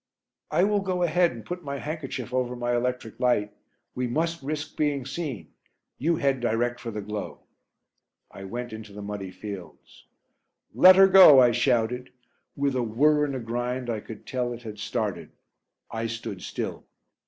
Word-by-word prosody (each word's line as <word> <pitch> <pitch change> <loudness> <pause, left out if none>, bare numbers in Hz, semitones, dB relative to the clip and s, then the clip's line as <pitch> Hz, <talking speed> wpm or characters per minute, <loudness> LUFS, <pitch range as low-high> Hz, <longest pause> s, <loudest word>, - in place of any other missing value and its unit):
"I 180 - +2
will 205 +1 +2
go 185 -2 -1
ahead 175 +1 +3
and 115 -3 -10
put 180 0 -6
my 140 -1 -4
handkerchief 135 -5 -5
over 125 -1 0
my 120 0 -1
electric 125 -2 -3
light; 115 -5 +1 0.4
we 125 0 -2
must 165 +6 -1
risk 150 +2 -4
being 145 -4 0
seen 135 - -5 0.5
you 165 +5 +2
head 135 -3 +1
direct 120 +1 0
for 120 - -6
the 105 -2 -5
glow." 105 0 -6 0.9
I 95 - -9
went 120 +3 -5
into 110 -2 -9
the 105 0 -8
muddy 100 -2 -5
fields. 95 -3 -10 0.7
"Let 185 0 +8
her 195 0 +8
go," 185 -8 +9
I 125 -2 +6
shouted. 125 0 0 0.4
With 140 -1 0
a 125 - +1
whir 150 +7 +3
and 140 -2 -3
a - - -3
grind 120 +1 -3
I 110 - -2
could 105 0 -11
tell 125 -1 -2
it 120 +1 -10
had 105 -2 -8
started. 105 -6 -3 0.6
I 115 0 -2
stood 115 0 -6
still. - - -5
125 Hz, 170 wpm, -26 LUFS, 115-145 Hz, 0.9 s, go